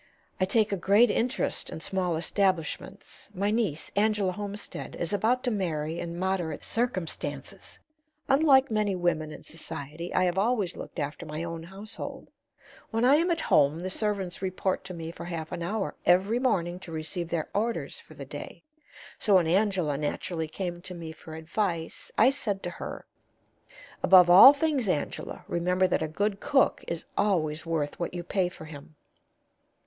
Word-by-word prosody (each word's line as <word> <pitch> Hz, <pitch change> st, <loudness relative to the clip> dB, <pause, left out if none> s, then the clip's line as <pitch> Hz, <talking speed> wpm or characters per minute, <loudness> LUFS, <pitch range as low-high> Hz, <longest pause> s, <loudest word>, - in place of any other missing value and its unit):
"I 185 Hz, -, +3 dB
take 215 Hz, +2 st, +2 dB
a 200 Hz, -, 0 dB
great 205 Hz, +7 st, +5 dB
interest 245 Hz, +2 st, 0 dB
in -, -, -6 dB
small 180 Hz, 0 st, -1 dB
establishments; 190 Hz, +2 st, -2 dB
my 200 Hz, +3 st, 0 dB
niece, 210 Hz, -9 st, -1 dB
Angela 205 Hz, -2 st, +2 dB
Homestead, 205 Hz, +2 st, -6 dB
is 170 Hz, +3 st, -3 dB
about 230 Hz, +5 st, +1 dB
to 245 Hz, -, 0 dB
marry 165 Hz, -5 st, -2 dB
in 170 Hz, 0 st, -5 dB
moderate 185 Hz, -3 st, -2 dB
circumstances. 185 Hz, -, -3 dB, 0.5 s
Unlike 270 Hz, -2 st, +5 dB
many 210 Hz, -2 st, +1 dB
women 165 Hz, -3 st, 0 dB
in -, -, -10 dB
society, 160 Hz, +1 st, -6 dB
I -, -, +4 dB
have 180 Hz, +1 st, +1 dB
always 210 Hz, -4 st, +1 dB
looked -, -, -9 dB
after 150 Hz, +2 st, -4 dB
my 155 Hz, +2 st, -4 dB
own 165 Hz, -1 st, -5 dB
household. 195 Hz, +6 st, -7 dB, 0.6 s
When 225 Hz, +1 st, +1 dB
I 275 Hz, +3 st, +6 dB
am 340 Hz, +3 st, +1 dB
at 335 Hz, -1 st, +1 dB
home 145 Hz, +1 st, +3 dB
the 185 Hz, +2 st, -4 dB
servants 200 Hz, -4 st, -2 dB
report 190 Hz, 0 st, -1 dB
to 185 Hz, -2 st, -7 dB
me 165 Hz, -1 st, -6 dB
for 170 Hz, -, -9 dB
half 165 Hz, -2 st, -5 dB
an -, -, -4 dB
hour 195 Hz, +4 st, -2 dB
every 195 Hz, +6 st, +3 dB
morning 180 Hz, -9 st, 0 dB
to 180 Hz, -3 st, -10 dB
receive 160 Hz, +2 st, -4 dB
their 165 Hz, -3 st, -2 dB
orders 225 Hz, +3 st, -2 dB
for -, -, -15 dB
the -, -, -8 dB
day. -, -, -9 dB, 0.6 s
So 205 Hz, -, +3 dB
when 180 Hz, -3 st, +5 dB
Angela 180 Hz, -5 st, +1 dB
naturally 160 Hz, +2 st, -2 dB
came 175 Hz, +1 st, -5 dB
to 180 Hz, 0 st, -6 dB
me 165 Hz, -2 st, -7 dB
for 160 Hz, 0 st, -11 dB
advice, 165 Hz, +1 st, -3 dB
I 250 Hz, +4 st, +6 dB
said 205 Hz, -8 st, -3 dB
to 175 Hz, -, -3 dB
her: -, -, -7 dB, 1.0 s
'Above 180 Hz, -2 st, +7 dB
all 195 Hz, +9 st, +11 dB
things, 290 Hz, -5 st, 0 dB
Angela, 150 Hz, -, -3 dB
remember 180 Hz, +2 st, +1 dB
that 180 Hz, -, +1 dB
a 160 Hz, -, 0 dB
good 200 Hz, +5 st, -1 dB
cook 270 Hz, -2 st, +2 dB
is 170 Hz, -1 st, -4 dB
always 155 Hz, -6 st, 0 dB
worth 155 Hz, -3 st, -2 dB
what 175 Hz, +1 st, -3 dB
you 175 Hz, -, -4 dB
pay 180 Hz, 0 st, 0 dB
for 170 Hz, -3 st, -11 dB
him.' 155 Hz, 0 st, -11 dB
185 Hz, 170 wpm, -28 LUFS, 165-205 Hz, 1.0 s, all